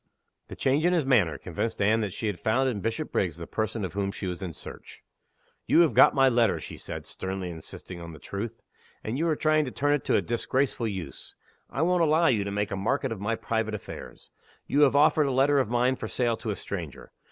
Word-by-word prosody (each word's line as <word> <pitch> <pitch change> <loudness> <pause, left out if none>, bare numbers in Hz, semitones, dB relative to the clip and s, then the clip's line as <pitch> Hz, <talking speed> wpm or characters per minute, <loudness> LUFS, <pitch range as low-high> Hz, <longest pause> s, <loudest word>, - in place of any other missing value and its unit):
The - - -8
change 140 +3 +1
in 175 +1 +3
his 165 -5 +2
manner 110 - +3
convinced 100 +6 -4
Anne 110 +3 +3
that 105 -3 -2
she 110 - -5
had 105 -5 -2
found 130 +7 +1
in 110 -6 -2
Bishopriggs 105 - -1
the 85 - -6
person 110 +1 -2
of 90 - -6
whom 100 0 -1
she 100 - -6
was 90 0 -4
in 90 -3 -4
search. - - -11 0.6
"You 170 - +6
have 165 - +3
got - - +6
my 135 -1 +5
letter," 120 -4 +3
she - - -8
said, - - -7
sternly 95 -1 -4
insisting 85 +2 -9
on 85 0 -8
the 80 - -10
truth. 105 +8 -6 0.4
"And 115 +5 -3
you 165 - +1
are 160 - +2
trying 155 0 +2
to - - -4
turn 145 +3 +1
it 145 - 0
to - - +2
a - - +3
disgraceful 120 +1 -1
use. 95 -10 -7 0.3
I 145 - -1
won't 180 +1 +2
allow 160 +1 +4
you 115 -10 +3
to 100 - -4
make 105 +1 -1
a - - -1
market 130 +7 -1
of 110 -4 -5
my 115 +3 0
private 110 -1 -2
affairs. 105 - -10 0.3
You 145 - +1
have 140 -1 +5
offered 150 0 +4
a - - 0
letter 135 +2 +3
of 130 - 0
mine 125 +2 +2
for 110 - -5
sale 120 0 0
to 110 - -5
a 105 - -1
stranger. 85 -10 -7
115 Hz, 235 wpm, -27 LUFS, 100-135 Hz, 0.6 s, You